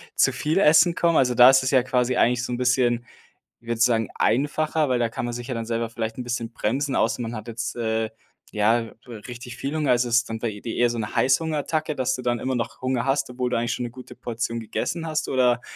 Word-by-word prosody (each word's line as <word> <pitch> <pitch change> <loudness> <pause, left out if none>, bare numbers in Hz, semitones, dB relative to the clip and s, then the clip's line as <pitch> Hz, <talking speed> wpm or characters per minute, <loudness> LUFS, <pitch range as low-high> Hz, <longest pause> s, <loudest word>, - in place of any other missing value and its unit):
zu - - +4
viel 155 +4 -1
Essen 160 0 +5
kommen. 170 -2 +2
Also, 125 -2 +3
da 125 +2 +9
ist 130 0 +5
es 130 - -1
ja 130 -3 +4
quasi 125 0 0
eigentlich 125 +1 +2
so 125 - -4
'n - - -2
bisschen, 125 -1 +1 0.6
ich 115 - -21
würde 115 -1 -1
sagen, 115 -2 +2
einfacher, 150 +4 +1
weil 125 -1 +1
da 120 - +2
kann 115 - -5
man 120 - -3
sich 120 0 -6
ja 130 - -3
dann 115 -1 -4
selber 115 0 -2
vielleicht 115 -1 -4
'n 125 - -4
bisschen 120 -1 -3
bremsen. 135 +5 -1
Außer 115 - +1
man 115 0 -4
hat 110 0 -7
jetzt, 115 +1 -5
äh, 110 -1 -1 0.4
ja, 115 +2 +2 0.2
w 120 - -10
richtig 125 0 -8
viel 140 +3 -4
Hunger. 150 -3 +1
Also, 120 0 +2
ist 120 +1 +2
dann 115 0 -4
bei 110 -3 -4
dir 115 - -5
eher 120 0 +3
so 120 - -3
'ne 105 -1 -4
Heißhungerattacke, 155 +2 0
dass 130 0 0
du 130 - -6
dann 120 -1 -1
immer 130 +2 -2
noch 115 -2 -4
Hunger 130 -2 -1
hast, 135 0 0
obwohl 125 0 -2
du - - 0
eigentlich 115 0 -1
schon - - -3
'ne 120 - -6
gute 125 +1 -11
Portion 115 0 -4
gegessen 160 +9 -3
hast, 155 -1 -2
oder, 125 -2 +2
125 Hz, 250 wpm, -24 LUFS, 115-130 Hz, 0.6 s, da